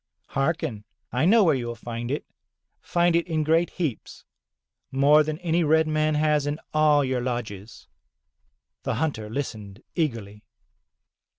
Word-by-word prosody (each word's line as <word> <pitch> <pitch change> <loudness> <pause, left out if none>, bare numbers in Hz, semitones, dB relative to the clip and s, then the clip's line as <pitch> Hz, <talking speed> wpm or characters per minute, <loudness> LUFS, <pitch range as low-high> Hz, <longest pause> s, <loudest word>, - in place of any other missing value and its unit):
"Hearken, 135 -7 -1 0.3
I 125 +5 +1
know 215 +4 +6
where 165 -4 +4
you 125 -3 -2
will 120 - -4
find 115 +1 -6
it, 145 - -2 0.6
find 175 -1 +2
it 170 +1 +1
in 160 -2 0
great 165 +3 +2
heaps, 155 -11 -5 0.7
more 140 +3 +5
than 155 0 -2
any 170 0 +1
red 160 +1 +3
man 155 0 +1
has 150 -1 +2
in 145 +2 -2
all 150 -2 +4
your 130 -1 -1
lodges." 115 -4 -5 0.9
The - - -2
hunter 125 -10 -2
Hstened 110 -5 -6
eagerly. 115 - -3
145 Hz, 140 wpm, -25 LUFS, 120-160 Hz, 0.9 s, know